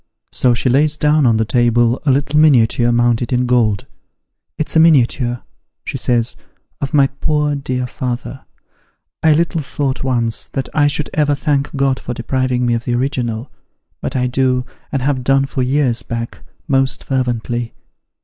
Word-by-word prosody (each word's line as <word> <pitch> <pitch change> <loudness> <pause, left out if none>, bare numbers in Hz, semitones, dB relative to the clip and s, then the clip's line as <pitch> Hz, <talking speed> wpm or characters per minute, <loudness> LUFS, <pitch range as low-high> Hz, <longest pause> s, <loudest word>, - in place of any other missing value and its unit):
So 125 -2 +2
she 115 - -1
lays 145 +4 +2
down 150 -2 +3
on 115 -2 +3
the 110 - +1
table 120 +1 +2
a - - +5
little 145 +3 +1
miniature 120 -5 +4
mounted 120 0 +1
in 125 0 +1
gold. 115 -5 +1 0.4
' - - -59
It's 155 - -3
a - - +6
miniature,' 125 -6 +3 0.4
she - - -5
says, 120 -1 0 0.3
' - - -46
of 140 - -2
my 145 -3 +5
poor 150 +2 -1
dear 130 -2 -3
father! 125 +1 -5 0.8
I 160 -1 +5
little 165 +1 0
thought 140 -2 -3
once, 120 -4 -1
that 135 -2 -4
I 145 -2 +3
should 145 +1 0
ever 145 -1 +2
thank 145 -1 -1
God 135 -1 +1
for 120 - -5
depriving 125 +1 -1
me 120 - +1
of 115 0 -2
the 120 - 0
original, 125 -2 -2 0.5
but - - -4
I 125 -1 +1
do, 125 0 0 0.3
and 135 -2 -1
have 135 -2 0
done 135 +1 +3
for 135 -1 -3
years 130 -2 +1
back, 115 -1 -6 0.3
most 135 -2 +1
fervently. 120 -2 -2
130 Hz, 170 wpm, -17 LUFS, 120-140 Hz, 0.8 s, a